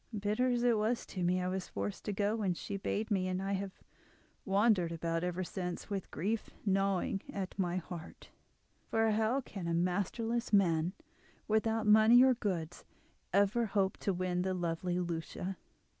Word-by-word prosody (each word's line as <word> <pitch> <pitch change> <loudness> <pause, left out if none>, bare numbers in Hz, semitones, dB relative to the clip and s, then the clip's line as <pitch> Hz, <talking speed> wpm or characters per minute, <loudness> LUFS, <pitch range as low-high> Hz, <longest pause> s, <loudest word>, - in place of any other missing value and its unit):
"Bitter 210 +5 +1
as 245 -1 +1
it 235 -3 +4
was 225 +3 0
to 185 - -6
me, 180 +1 +2
I 180 - -1
was 185 0 -3
forced 100 0 -4
to - - -1
go 205 +2 0
when 195 -5 0
she 200 - -5
bade 210 +3 -2
me, 185 -2 +1
and 185 0 -1
I 195 +1 -2
have 195 0 -4 0.7
wandered 195 -3 +3
about 165 0 -2
ever 180 +1 -1
since, 180 +1 -5
with 195 -2 -3
grief 210 +9 -2 0.2
gnawing 195 -1 +1
at 195 0 -5
my 180 -1 0
heart; 170 -2 -8 0.6
for 225 0 +2
how 220 +5 +1
can 195 -7 -7
a 170 - +1
masterless 210 +7 -1
man, 175 -4 +3 0.5
without 220 0 +1
money 220 +3 +7
or 260 0 +6
goods, 180 -8 -3 0.5
ever 205 +4 +3
hope 195 -2 +1
to 200 - -1
win 180 -1 -1
the 185 0 -1
lovely 175 0 -1
Lucia?" 175 +2 -3
195 Hz, 170 wpm, -33 LUFS, 180-215 Hz, 0.7 s, money